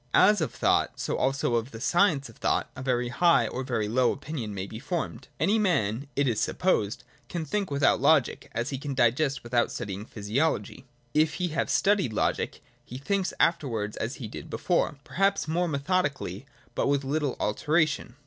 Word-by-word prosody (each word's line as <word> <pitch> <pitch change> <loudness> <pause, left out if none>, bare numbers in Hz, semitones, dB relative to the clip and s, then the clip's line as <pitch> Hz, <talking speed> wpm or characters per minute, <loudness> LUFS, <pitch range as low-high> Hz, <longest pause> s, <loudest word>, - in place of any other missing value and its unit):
As 205 0 +6
of 160 - -1
thought, - - +1
so - - -1
also 135 -2 0
of 115 +1 0
the 115 - -9
science 170 - +2
of 115 - -15
thought, - - 0
a 130 - -7
very 125 -2 0
hio 170 +7 +4
h - - -3
or 130 - -2
a - - -3
very 120 -5 -1
lowr 125 +3 +3
opinion 135 -6 -5
may 95 -2 -4
be 110 +2 -8
formed. 165 +4 -4
Any 215 +3 +3
man, 135 - +1
it 140 0 +2
is 115 -4 +1
supposed, 110 - 0 0.3
can 170 -2 -3
think 200 +5 -1
without 140 0 +2
Logic, 155 -6 +3
as 120 +4 -2
he 135 - -3
can 140 -1 -4
digest 130 +3 +2
without 120 0 +1
studying 100 +1 -5
physiology. 115 +3 -2 0.3
If 155 0 +3
he 180 -1 -1
have 155 - -1
studied 195 - +2
Logic, - - -1 0.2
he 125 - -8
thinks 195 +7 -1
afterwards 115 -11 +1
as 115 +4 -3
he 120 - -6
did - - -9
before, 145 - 0
perhaps 195 +3 +1
more 175 +3 +1
methodically, 150 +1 -1 0.3
but - - 0
with 140 0 +1
Uttle 145 -1 -1
alteration. 150 +3 0
140 Hz, 185 wpm, -27 LUFS, 120-160 Hz, 0.3 s, As